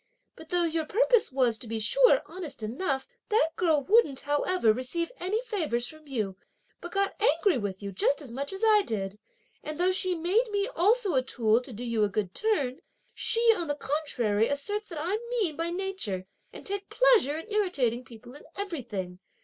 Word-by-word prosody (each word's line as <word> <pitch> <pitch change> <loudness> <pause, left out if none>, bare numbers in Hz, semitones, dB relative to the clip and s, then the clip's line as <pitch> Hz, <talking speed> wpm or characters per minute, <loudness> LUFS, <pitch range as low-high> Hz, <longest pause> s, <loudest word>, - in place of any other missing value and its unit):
But 320 - -13
though 355 0 +2
your 325 -1 0
purpose 475 - +3
was, 250 -4 +1
to 240 - -8
be 225 0 -3
sure, - - +4
honest 335 -11 -6
enough, 265 - -2 0.2
that 420 -7 +3
girl 315 -5 +2
wouldn't, 380 - +3
however, 290 -3 +2
receive 260 - -2
any 385 +5 -1
favours 315 - -1
from 310 +3 -8
you, 215 -8 -3 0.4
but 345 - -8
got 395 0 +1
angry 330 -1 +3
with 200 -2 -5
you 200 - -4
just 205 +9 +1
as 275 -6 -9
much 280 +4 -4
as 385 +2 -6
I 430 -1 +6
did; 205 - -4 0.4
and 305 0 -5
though 365 +1 +3
she 370 -1 +3
made 380 +9 +1
me 405 -1 0
also 410 +1 +3
a 260 - +3
tool 235 -3 +1
to 255 - -11
do 235 +2 -7
you 230 -3 0
a 205 - +2
good 200 -2 -2
turn, 290 - 0 0.3
she, 460 - +1
on 345 -4 -3
the 290 - -1
contrary, 250 -8 0
asserts 410 +10 -2
that 335 - -7
I'm 365 +8 -1 0.2
mean 340 -8 0
by 330 +2 -2
nature 350 - -3 0.3
and - - -11
take 400 0 -3
pleasure 470 - +4
in 330 +7 -9
irritating 275 - +1
people 240 0 -13
in 290 - -12
everything! 235 - -5
305 Hz, 190 wpm, -28 LUFS, 240-385 Hz, 0.4 s, I